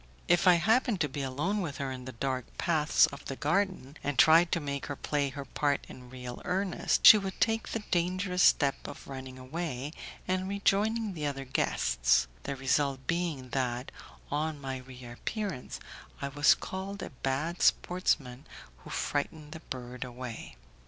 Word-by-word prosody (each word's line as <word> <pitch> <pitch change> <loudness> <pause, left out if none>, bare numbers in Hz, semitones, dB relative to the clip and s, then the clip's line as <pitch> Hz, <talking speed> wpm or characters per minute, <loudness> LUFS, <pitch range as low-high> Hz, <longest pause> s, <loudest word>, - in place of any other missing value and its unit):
If 175 +2 +4
I 180 - +8
happened 220 +3 +2
to 150 - +3
be 140 +1 -5
alone 150 +11 -1
with 145 -7 -4
her 135 -1 -3
in 130 -1 -7
the 130 - -6
dark 130 0 -3
paths 160 -3 +4
of 140 - -9
the 135 - -4
garden, 155 -2 -1
and 145 -2 -2
tried 165 +6 +6
to 170 - +2
make 140 -2 -4
her 145 - -4
play 145 0 -1
her 140 +1 -7
part 145 +1 0
in 125 -1 -12
real 125 -1 -8
earnest, 185 +1 0
she 215 - +11
would 195 -1 -5
take 225 -1 +1
the 225 - -3
dangerous 180 +1 +1
step 140 -5 +4
of - - -10
running 130 -1 -7
away, 140 +1 -4 0.3
and 185 +1 0
rejoining 205 +2 +1
the 150 -4 -2
other 135 -1 -4
guests; - - +2 0.2
the 140 - -4
result 135 0 0
being 165 -7 -2
that, 125 0 -2 0.4
on 150 +1 -1
my 135 -1 -4
reappearance, 130 - -6 0.4
I 140 - -3
was 145 +1 +5
called 195 +1 -6
a - - -7
bad 135 +7 -2
sportsman 140 -7 +1 0.3
who - - -13
frightened 150 +1 -3
the 160 - -7
bird 125 -4 -6
away. 120 - -7
145 Hz, 165 wpm, -30 LUFS, 130-180 Hz, 0.4 s, she